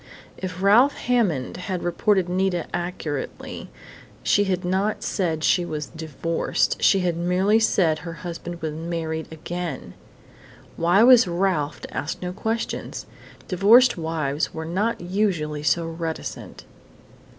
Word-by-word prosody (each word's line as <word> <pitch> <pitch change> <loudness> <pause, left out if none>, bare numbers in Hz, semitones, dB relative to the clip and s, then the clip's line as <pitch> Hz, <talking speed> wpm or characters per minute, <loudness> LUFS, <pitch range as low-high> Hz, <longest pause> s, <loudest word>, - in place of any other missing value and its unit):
If 185 0 -6
Ralph 235 +8 +5
Hammond 205 - 0
had 185 -1 -4
reported 185 +2 +1
Nita 180 -1 0
accurately 175 -5 -5 0.5
she 205 - +3
had 185 -2 -1
not 190 +4 0
said 165 -5 -1
she 180 - +3
was 155 -3 -4
divorced. 160 +1 -1
She 195 - +4
had 175 -2 0
merely 180 +5 +2
said 175 -8 +2
her 170 0 -7
husband 170 0 -6
was 155 -1 -2
married 160 0 -4
again! 165 -1 -5 0.8
Why 175 +6 +4
was 250 -3 +7
Ralph 170 -4 0
to - - -9
ask 145 - -3
no 180 0 -4
questions? 225 +4 -3 0.4
Divorced 220 +8 +5
wives 160 -3 -2
were 160 0 -4
not 200 +8 -1
usually 175 -5 -1
so 150 +3 +1
reticent.... 165 0 -6
175 Hz, 130 wpm, -23 LUFS, 160-195 Hz, 0.8 s, was